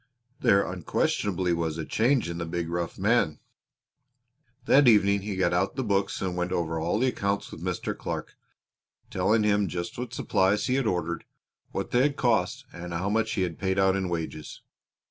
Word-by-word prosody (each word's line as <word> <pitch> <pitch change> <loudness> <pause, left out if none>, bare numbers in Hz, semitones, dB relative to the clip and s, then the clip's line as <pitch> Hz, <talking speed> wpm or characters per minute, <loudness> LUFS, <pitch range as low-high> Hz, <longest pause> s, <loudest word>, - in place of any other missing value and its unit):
There 100 0 +4
unquestionably 90 0 0
was 80 -2 -1
a 80 - -4
change 125 -1 +2
in 85 0 -4
the 85 - -2
big 85 0 -3
rough 85 0 -3
man. 100 -5 +2 1.3
That 140 -1 +5
evening 100 -3 +5
he 100 0 -4
got 95 -1 +1
out 90 +3 0
the 130 - -1
books 100 -4 0
and 90 -2 -2
went 90 0 -2
over 85 -3 -1
all 85 +5 0
the 130 +3 +2
accounts 100 -4 -2
with - - -9
Mr. - - -2
Clark, - - -5 0.8
telling 105 +4 +2
him 105 -1 +2
just 85 +5 -5
what 125 -1 -4
supplies 105 -3 +1
he 125 - 0
had 135 -3 +1
ordered; 85 -3 -1 0.5
what - - -4
they 120 - +4
had 140 +1 +2
cost; 120 -5 +1
and 85 0 -7
how 95 +4 -1
much 110 +1 +1
he 95 - 0
had 90 - -4
paid 95 0 0
out 95 -1 +4
in 95 -2 -1
wages. 80 -3 -5
95 Hz, 185 wpm, -27 LUFS, 85-105 Hz, 1.3 s, That